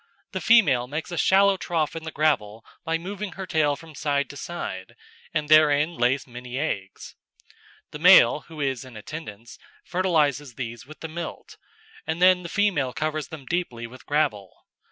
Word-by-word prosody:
The - - -4
female 150 - +4
makes 150 +6 -5
a - - -3
shallow 195 +3 +4
trough 165 -5 -2
in 165 0 -6
the 160 - -5
gravel 115 -9 0 0.2
by 165 0 0
moving 195 +3 -6
her 190 - -6
tail 155 -5 +1
from 160 +1 -14
side 140 -1 -1
to - - -12
side, 175 +5 -6 0.4
and 150 -2 -1
therein 155 +1 +5
lays 130 -1 +1
many 125 0 -8
eggs. 100 -10 -4 0.8
The 150 - -8
male, 160 -7 +7
who 160 -2 -11
is 135 -3 -1
in 125 -4 -12
attendance, 115 -3 -9 0.3
fertilises 150 -8 0
these 120 0 -6
with 155 - -13
the 160 - -4
milt, 165 +1 -7 0.5
and 160 +1 -2
then 180 0 +5
the 170 - -7
female 170 -12 +1
covers 155 -1 -2
them 155 -4 -10
deeply 130 -8 -3
with 115 +1 -13
gravel. 140 - -1
150 Hz, 170 wpm, -25 LUFS, 130-170 Hz, 0.8 s, male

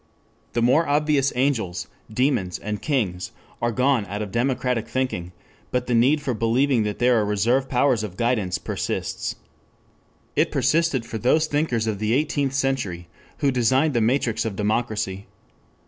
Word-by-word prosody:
The 120 - +1
more 140 +8 +4
obvious 145 -1 +2
angels, 125 -9 0 0.2
demons, 115 -7 0
and 105 0 -5
kings 105 - -1 0.3
are 120 0 +1
gone 125 -3 +1
out 100 +2 -3
of 100 - -7
democratic 125 0 0
thinking, 125 -10 -2 0.4
but 125 0 -1
the 125 - -1
need 130 +6 +4
for 135 -3 -1
believing 120 +3 +2
that 105 -1 -2
there 125 -1 +3
are - - +2
reserve 115 +6 +1
powers 125 -3 +2
of 95 -4 -6
guidance 115 -6 0
persists. - - -3 1.0
It - - +3
persisted 160 -7 +1
for 110 - -5
those 155 +8 +3
thinkers 145 -7 0
of 110 -3 -2
the 110 +1 0
Eighteenth 140 -1 0
Century 120 -11 -1 0.4
who 140 - +4
designed 130 +4 +2
the 120 - +2
matrix 115 -1 +1
of 110 -3 -3
democracy. 105 -2 -1
120 Hz, 155 wpm, -23 LUFS, 105-135 Hz, 1.0 s, more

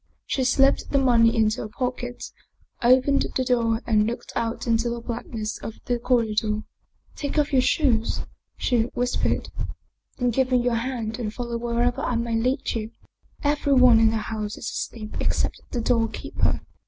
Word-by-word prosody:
She 265 - -1
slipped 270 +2 +3
the 280 - +2
money 235 -4 +4
into 220 -1 +2
her - - -4
pocket, 245 +1 -4 0.5
opened 260 +3 +4
the 260 - +2
door 230 -2 +1
and 215 -2 +3
looked 235 - -5
out 230 0 -2
into 230 0 +1
the 235 0 -3
blackness 230 -2 -5
of 225 - -7
the 245 -1 0
corridor. 220 -3 +1 0.2
" - - -36
Take 285 +1 -4
off 295 -1 +1
your 260 - +5
shoes," 250 -5 +1 0.4
she 240 -3 +1
whispered. 245 0 0 0.4
" - - -43
Then 245 -1 +1
give 260 +2 +1
me 255 - +4
your 245 0 +1
hand 230 -1 -2
and 215 -3 -2
follow 235 0 -4
wherever 240 +2 0
I 250 - -1
may 230 0 -1
lead 255 +4 0
you. 220 -1 -3 0.5
Every 290 -1 +2
one 255 -3 +7
in 225 0 +5
the 225 - -1
house 215 -1 -4
is - - -6
asleep 215 -2 -5
except - - -1
the 240 - -2
doorkeeper." 230 -1 0
235 Hz, 175 wpm, -24 LUFS, 225-255 Hz, 0.5 s, one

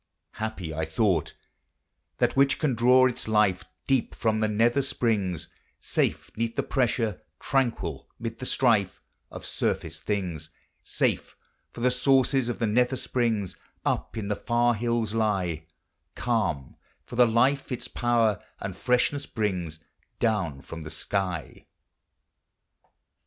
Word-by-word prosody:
Happy, 105 -7 -4
I 80 +1 -2
thought, 85 0 +1 0.8
that - - +2
which 135 0 +4
can 150 -5 +1
draw 125 +2 +5
its 125 -2 -1
life 105 -4 +2 0.2
Deep 135 -3 +1
from 110 -1 +1
the 110 - +2
nether 115 +5 +3
springs, 100 - 0 0.3
Safe 80 +1 -1
'neath 115 +1 -2
the - - 0
pressure, 115 -5 0 0.2
tranquil 115 - -1
mid 115 0 -5
the 130 - -4
strife, 110 -7 +2 0.3
Of - - -8
surface - - -2
things. 90 -7 -3 0.3
Safe - - -1 0.2
— - - -46
for 120 - -9
the 125 +1 +3
sources 130 0 +3
of 120 - -2
the 115 - 0
nether 125 +4 +2
springs 115 -7 -1 0.3
Up - - -1
in 105 -2 -3
the 105 - 0
far 120 +2 +2
hills 115 -1 -1
lie; 95 -8 0 0.5
Calm 105 - -1
— - - -40
for - - -9
the 125 0 +6
life 130 +5 +2
its 125 - -4
power 115 -4 +1 0.2
and 100 -2 -5
freshness 125 +6 +1
brings 90 -8 -2 0.4
Down 95 - 0
from 80 +3 -8
the 75 - -7
sky. 90 -1 -3
110 Hz, 140 wpm, -27 LUFS, 95-120 Hz, 0.8 s, the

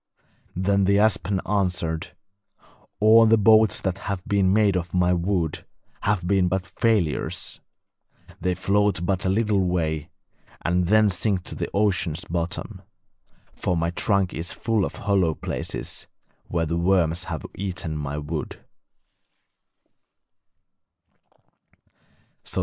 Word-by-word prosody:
Then 100 +1 +2
the 100 +1 +3
aspen 100 -3 +2
answered: 90 -4 -1 0.8
'All 110 +1 +7
the 115 +1 +5
boats 110 +1 +5
that 95 0 -2
have 95 -2 -3
been 100 -2 +2
made 105 -1 +3
of 85 -1 -3
my 90 0 +3
wood 85 -2 -1 0.4
have 100 -4 0
been 95 0 +2
but 95 +1 -1
failures; 95 -2 -1 0.8
they 90 -1 0
float 100 -1 +1
but 95 0 -1
a - - +2
little 105 -1 +2
way, 80 -3 -1 0.6
and 90 +1 +1
then 110 +2 +5
sink 95 0 -1
to - - -7
the - - -4
ocean's 95 -6 0
bottom, 85 0 -4 0.7
for 90 - -1
my 85 +1 0
trunk 100 0 +1
is 85 +2 -3
full 110 -4 0
of - - -6
hollow 95 -6 +1
places, - - -4 0.4
where 85 -1 -1
the 85 +2 -2
worms 85 -1 +1
have 80 -5 -5
eaten 90 -5 -4
my 75 -1 -4
wood.' 75 +1 -5
95 Hz, 120 wpm, -24 LUFS, 85-100 Hz, 0.8 s, All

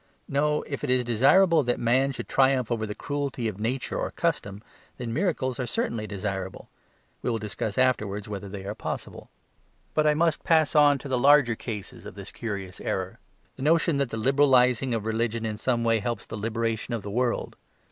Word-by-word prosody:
No, 150 +2 +1
if 140 - -6
it - - -2
is 125 -1 +3
desirable 155 - +5
that 120 -2 0
man 130 +4 +2
should 120 -3 -7
triumph 130 -3 +2
over 110 -2 -1
the 105 - -5
cruelty 140 -4 -3
of 105 -2 -5
nature 120 +4 -2
or - - -1
custom, 100 +1 -2 0.3
then 120 -2 -4
miracles 140 -6 -1
are 125 - -2
certainly 110 -1 -2
desirable; 95 -2 -5 0.5
we - - -1
will 115 - 0
discuss 105 0 -4
afterwards 105 -6 +1
whether 100 -1 -6
they 95 -1 -7
are 100 - -3
possible. - - -6 0.6
But 155 0 +2
I 150 - +4
must 165 0 +1
pass 160 -3 +3
on 145 -1 +6
to 140 - -9
the 130 -2 0
larger 140 -2 +5
cases 110 -3 -7
of - - -10
this 100 -1 -8
curious 100 -5 -6
error; 95 -1 -3 0.4
the - - -9
notion 160 +1 +3
that 140 -3 0
the 115 - -4
"liberalising" 130 -1 +3
of 110 -2 -3
religion 115 0 -1
in 110 -1 -3
some 120 +1 0
way 115 -1 +3
helps 115 +1 -3
the - - -7
liberation 115 +2 -2
of 110 - -5
the 100 - -6
world. 120 +2 -1
120 Hz, 195 wpm, -26 LUFS, 110-135 Hz, 0.6 s, on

